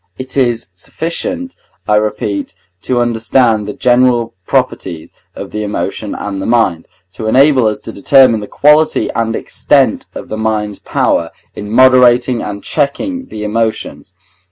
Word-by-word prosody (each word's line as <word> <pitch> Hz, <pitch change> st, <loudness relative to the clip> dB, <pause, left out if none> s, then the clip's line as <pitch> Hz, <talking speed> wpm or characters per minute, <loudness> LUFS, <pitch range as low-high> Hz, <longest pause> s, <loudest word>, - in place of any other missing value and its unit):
It 130 Hz, 0 st, -7 dB
is 120 Hz, -6 st, 0 dB
sufficient, 255 Hz, -, -4 dB, 0.3 s
I 105 Hz, -, +2 dB
repeat, 105 Hz, -1 st, -2 dB, 0.3 s
to 125 Hz, -1 st, -1 dB
understand 115 Hz, -2 st, +1 dB
the 105 Hz, -, -5 dB
general 125 Hz, -1 st, +2 dB
properties 80 Hz, -2 st, -2 dB, 0.2 s
of -, -, -8 dB
the 105 Hz, -, -4 dB
emotions 105 Hz, -1 st, -4 dB
and 100 Hz, -1 st, -5 dB
the -, -, -4 dB
mind, 115 Hz, -9 st, +1 dB, 0.3 s
to 110 Hz, -, -5 dB
enable 130 Hz, 0 st, +4 dB
us 105 Hz, -, -1 dB
to -, -, -7 dB
determine 130 Hz, +2 st, +4 dB
the 105 Hz, -, -7 dB
quality 150 Hz, +2 st, +2 dB
and 115 Hz, 0 st, -1 dB
extent -, -, +1 dB
of -, -, -8 dB
the 110 Hz, -, -4 dB
mind's 105 Hz, -2 st, -2 dB
power 85 Hz, -1 st, 0 dB, 0.2 s
in 105 Hz, 0 st, -7 dB
moderating 125 Hz, 0 st, +4 dB
and 100 Hz, -1 st, -6 dB
checking 265 Hz, -, -2 dB
the 105 Hz, -, -7 dB
emotions. 110 Hz, -4 st, -3 dB
115 Hz, 145 wpm, -14 LUFS, 105-130 Hz, 0.3 s, enable